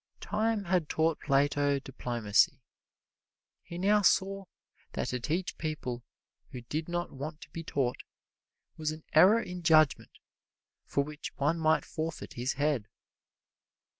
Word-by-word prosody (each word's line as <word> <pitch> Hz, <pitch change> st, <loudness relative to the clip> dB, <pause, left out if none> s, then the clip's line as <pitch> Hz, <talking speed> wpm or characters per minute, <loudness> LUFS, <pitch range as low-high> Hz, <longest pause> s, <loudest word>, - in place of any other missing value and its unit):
Time 215 Hz, 0 st, 0 dB
had 175 Hz, -4 st, 0 dB
taught 160 Hz, 0 st, +1 dB
Plato 145 Hz, 0 st, +2 dB
diplomacy. 120 Hz, -1 st, +1 dB, 1.0 s
He 170 Hz, -, -9 dB
now 205 Hz, +3 st, +3 dB
saw 195 Hz, 0 st, +2 dB, 0.5 s
that -, -, -2 dB
to 125 Hz, -, -2 dB
teach 165 Hz, +8 st, -2 dB
people 130 Hz, -6 st, -4 dB, 0.5 s
who 125 Hz, -, -7 dB
did 155 Hz, +7 st, -4 dB
not 175 Hz, 0 st, -2 dB
want 150 Hz, +4 st, -6 dB
to -, -, -12 dB
be 165 Hz, -, -6 dB
taught 135 Hz, -5 st, -1 dB, 0.8 s
was 155 Hz, -1 st, -1 dB
an 155 Hz, 0 st, -6 dB
error 190 Hz, +8 st, +7 dB
in 180 Hz, -5 st, -6 dB
judgment 155 Hz, -3 st, +3 dB, 0.7 s
for 140 Hz, -, +1 dB
which 150 Hz, +1 st, -8 dB
one 150 Hz, +4 st, +1 dB
might 160 Hz, 0 st, +3 dB
forfeit 160 Hz, 0 st, -5 dB
his 125 Hz, +2 st, -1 dB
head. 145 Hz, -7 st, 0 dB
155 Hz, 135 wpm, -30 LUFS, 140-175 Hz, 1.0 s, error